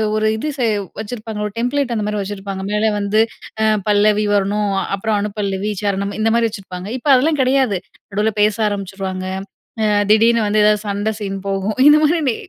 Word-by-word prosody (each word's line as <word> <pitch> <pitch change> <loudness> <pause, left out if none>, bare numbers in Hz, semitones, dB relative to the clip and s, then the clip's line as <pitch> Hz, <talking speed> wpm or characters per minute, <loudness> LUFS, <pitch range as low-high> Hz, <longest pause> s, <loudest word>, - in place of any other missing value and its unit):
ஒரு 215 0 +1
இது 305 +7 -3
சே 245 - +1 0.3
வச்சிருப்பாங்க. 220 -1 -5
ஒரு 205 - -10
டெம்ப்லேட் 250 +1 0
அந்த 210 - -1
மாரி 210 -1 -2
வச்சிருப்பாங்க. 195 -1 -5
மேலே 210 +1 +2
வந்து 205 +2 +2 0.4
அ - - +3 0.2
பல்லவி 210 0 +3
வரணும். 205 +1 0 0.2
அப்பறம் 215 +1 -1
அணு 210 0 -2
பல்லவி, 200 +1 -1
சரணம் 200 0 -1
இந்த 225 +1 +2
மாரி 230 -1 +3
வச்சிருப்பாங்க. 185 -2 -8
இப்ப 290 - -2
அதெல்லாம் 295 +4 +2
கிடையாது. 255 -6 +2 0.3
நடுவில 210 +2 0
பேச 210 0 +3
ஆரம்பிச்சுருவாங்க. 195 -1 -4 0.6
அ - - +3 0.2
திடீர்னு 225 0 +4
வந்து 210 +1 +2
ஏதாவது 210 0 +3
சண்டை 205 +2 -1
சீன் 195 -1 -3
போகும். 195 +2 -2
இந்த 300 +1 +7
மாதிரி 330 +3 +2
டே 230 - 0
210 Hz, 180 wpm, -18 LUFS, 200-225 Hz, 0.6 s, இந்த